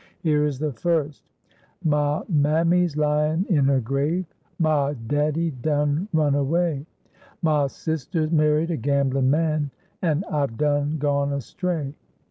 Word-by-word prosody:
Here 150 -2 +2
is 145 -3 -3
the 150 0 -2
first: 150 +2 -1 0.6
"Mah 150 -1 +1
mammy's 165 +1 +2
lyin' 150 +3 +1
in 150 -7 +3
her 135 -1 +3
grave, 140 +9 -1 0.3
Mah 150 -3 +2
daddy 150 +5 0
done 145 +5 0
run 150 -3 +2
away, 150 +1 0 0.6
Mah 150 -3 +3
sister's 155 +2 -3
married 155 +1 +2
a 165 - -1
gamblin' 135 0 +1
man, 155 -1 +1 0.3
An' 165 -1 +1
I've 140 -7 -1
done 145 +1 +1
gone 140 -1 0
astray. 145 - -3
150 Hz, 125 wpm, -24 LUFS, 140-160 Hz, 0.6 s, in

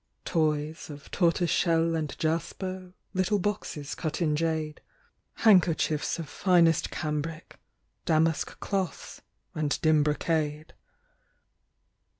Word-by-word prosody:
Toys 155 -1 -1
of 145 -1 -11
tortoiseshell 165 -1 +2
and 155 -3 -3
jasper, 180 +3 -3 0.2
Little 185 +2 +1
boxes 175 -7 -3
cut 155 -2 -3
in 155 -4 +1
jade; 160 -1 -2 0.6
Handkerchiefs 170 -7 +3
of 165 -3 -5
finest 170 -3 +3
cambric, 155 +1 -4 0.5
Damask 160 -1 +1
cloths 195 -3 -3 0.3
and 150 -2 -1
dim 155 -1 +5
brocade. 150 0 -1
160 Hz, 95 wpm, -28 LUFS, 155-175 Hz, 0.6 s, dim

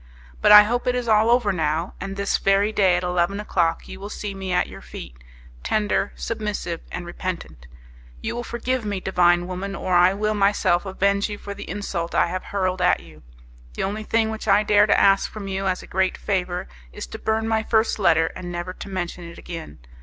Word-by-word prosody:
"But - - +5
I 210 0 +11
hope 240 +4 -2
it 250 - +2
is 245 -1 -2
all 220 0 +4
over 240 -4 +3
now, 160 +1 -1
and 195 0 -5
this 200 0 0
very 195 +2 +2
day 190 -4 +3
at 175 - -1
eleven 180 +2 0
o'clock 170 -5 0
you 190 - -9
will 200 +1 -7
see 210 -1 -5
me 190 -1 -5
at 180 - +2
your - - -11
feet - - -10 0.5
tender, 205 - 0
submissive 210 -7 -4
and 180 -1 -5
repentant. 175 - -6 0.5
You - - -4
will 240 - -3
forgive 240 +1 -2
me, 205 -2 -2
divine 175 -2 +3
woman, 185 +2 -5
or 185 -1 -2
I 180 +2 +5
will 215 +1 0
myself 200 -3 +2
avenge 200 +2 +1
you 205 - -5
for 200 0 -7
the - - -9
insult 180 -3 -4
I - - +4
have 185 +2 -4
hurled 185 -2 -1
at 180 - +3
you. 80 -2 -16 0.5
The - - -2
only 210 +3 -3
thing 220 0 +1
which 220 0 -6
I 205 +1 +5
dare 210 0 +4
to - - +4
ask 195 0 +4
from 210 -2 -7
you 195 0 -2
as 185 -1 -1
a - - -14
great 190 0 +1
favour 180 -3 -2 0.2
is - - -7
to - - -9
burn 220 0 0
my 220 -1 +1
first 220 0 +1
letter, 165 -4 +3
and 175 -1 -6
never 175 +1 -4
to 200 - -9
mention 175 -2 -4
it 170 0 -10
again. 165 - -8
195 Hz, 215 wpm, -23 LUFS, 175-210 Hz, 0.5 s, I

